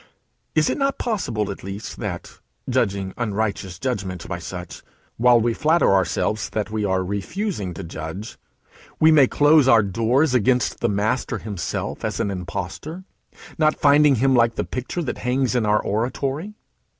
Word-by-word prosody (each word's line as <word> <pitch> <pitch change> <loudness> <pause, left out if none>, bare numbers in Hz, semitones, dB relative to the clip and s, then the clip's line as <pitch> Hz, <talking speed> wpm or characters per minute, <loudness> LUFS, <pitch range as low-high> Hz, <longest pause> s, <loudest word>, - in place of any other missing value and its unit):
Is 155 -1 +3
it - - -1
not 275 0 +1
possible 115 - -2
at 95 - -9
least 100 +3 -7
that, 95 -5 -6 0.3
judging 100 -7 0
unrighteous 105 -5 -2
judgment 95 -7 -3
by 90 -2 -4
such 90 0 -8 0.4
while 120 0 +5
we 115 +1 +1
flatter 155 -3 +3
ourselves 100 +2 0
that 105 -1 -3
we 110 -1 -1
are 95 -2 +1
refusing 100 - -3
to - - -6
judge, 85 +6 -7 0.6
we 160 +1 +6
may 145 -4 +6
close 145 0 +4
our 115 -4 +6
doors 115 - +1
against 125 0 +2
the 120 - +1
Master 110 +4 -1
himself 100 -5 -4
as - - -2
an 100 - 0
impostor, 95 - -5 0.6
not 155 -1 +3
finding 145 -1 +5
him 135 +3 +2
like 115 -1 +3
the - - -1
picture 130 +7 -4
that 135 - -4
hangs 125 +1 0
in 120 -4 +1
our 105 0 +3
oratory. 135 - -2
115 Hz, 160 wpm, -22 LUFS, 100-135 Hz, 0.6 s, we